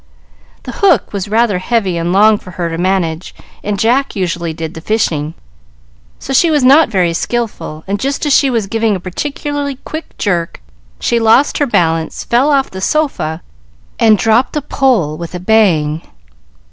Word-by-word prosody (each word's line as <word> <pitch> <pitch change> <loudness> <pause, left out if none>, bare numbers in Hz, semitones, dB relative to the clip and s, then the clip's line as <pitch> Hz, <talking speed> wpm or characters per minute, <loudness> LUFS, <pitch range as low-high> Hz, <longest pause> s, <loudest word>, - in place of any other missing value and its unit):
The 250 - -6
hook 395 - +3
was 200 0 -3
rather 215 -2 +1
heavy 195 -2 0
and 170 +1 -1
long 210 +2 +4
for - - -13
her 175 -1 -3
to 165 - -3
manage, 180 -2 -1 0.3
and 205 0 -2
Jack 245 +7 +1
usually 170 -3 -2
did 160 0 -6
the 160 - -9
fishing, 160 -7 -1 0.8
so 270 - -6
she 335 +5 +4
was 300 -4 +2
not 280 +4 +6
very 180 -5 +1
skilful; 210 -6 -3
and 200 +1 -2
just 275 +6 -2
as 290 - +2
she 275 - +4
was 230 -5 0
giving 225 +1 0
a - - -4
particularly 285 - -4
quick 315 0 -7
jerk, 175 -5 -2 0.4
she 235 - +1
lost 230 +5 +3
her 290 - +1
balance, 165 -7 0
fell 245 +5 +2
off 275 -2 +1
the 190 - -7
sofa, 190 - -1 0.6
and 220 -2 +5
dropped 225 +5 +2
the 300 - -2
pole 230 - +1
with 170 +1 -6
a - - -4
bang. 175 -7 +2
210 Hz, 170 wpm, -14 LUFS, 170-255 Hz, 0.8 s, not